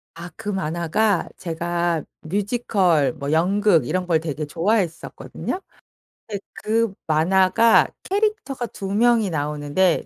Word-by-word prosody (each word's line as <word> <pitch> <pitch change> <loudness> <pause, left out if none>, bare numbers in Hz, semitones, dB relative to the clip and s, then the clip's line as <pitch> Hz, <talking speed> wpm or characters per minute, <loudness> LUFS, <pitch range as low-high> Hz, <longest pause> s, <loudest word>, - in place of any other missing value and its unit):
아. 170 +2 -8
그 205 - -6
만화가 180 +2 0
제가 170 -1 -1 0.2
뮤지컬 190 - +1
뭐 145 -1 -4
연극 180 - +3
이런 185 0 -1
걸 165 -3 +3
되게 155 -1 -4
좋아했었거든요. 190 - -2 0.7
근데 205 -3 -5
그 225 -1 0
만화가 185 +7 +4 0.2
캐릭터가 400 - -1
2 195 -2 -6
명이 230 -1 +3
나오는데 150 +3 0
185 Hz, 245 characters per minute, -22 LUFS, 160-210 Hz, 0.7 s, 만화가